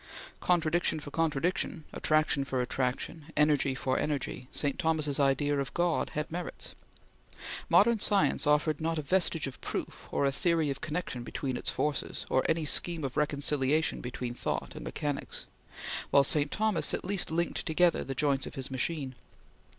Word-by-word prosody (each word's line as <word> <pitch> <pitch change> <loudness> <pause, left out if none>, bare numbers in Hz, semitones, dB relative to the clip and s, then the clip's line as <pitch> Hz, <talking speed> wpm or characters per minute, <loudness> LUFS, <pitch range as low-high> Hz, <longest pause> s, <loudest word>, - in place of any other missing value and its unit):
Contradiction 170 -2 +2
for 145 -1 -8
contradiction, 165 +1 0
Attraction 155 -2 +2
for 135 -1 -2
attraction, 130 +5 -2
Energy 145 -3 +3
for 130 0 0
energy, 140 -3 -2
St. 145 +3 -1
Thomas's 155 -5 +1
idea 145 +1 +2
of 135 -1 -4
God 175 -1 +1
had 150 +1 -2
merits. 175 +2 -5 1.0
Modern 225 +2 +5
science 200 -6 +3
offered 150 0 +2
not 165 +1 0
a 155 - -2
vestige 175 0 +2
of 135 - -7
proof, - - -5
or - - +1
a 140 - +3
theory 160 0 +1
of 135 - -6
connection 155 -5 -3
between 130 +2 -3
its - - -2
forces, 150 -1 -2
or 130 - +3
any 160 -1 +1
scheme 165 +2 +1
of 135 -2 -3
reconciliation 145 +1 +1
between 125 0 -4
thought - - -3
and - - -8
mechanics; 145 -2 -4 0.6
while 140 - +6
St. 145 +1 +2
Thomas 215 -1 +1
at - - -6
least 195 -1 0
linked 170 +2 -1
together 170 +2 +3
the 135 - -5
joints 140 -2 +1
of - - -9
his 135 0 -3
machine. 135 0 -2
150 Hz, 160 wpm, -30 LUFS, 135-165 Hz, 1.0 s, while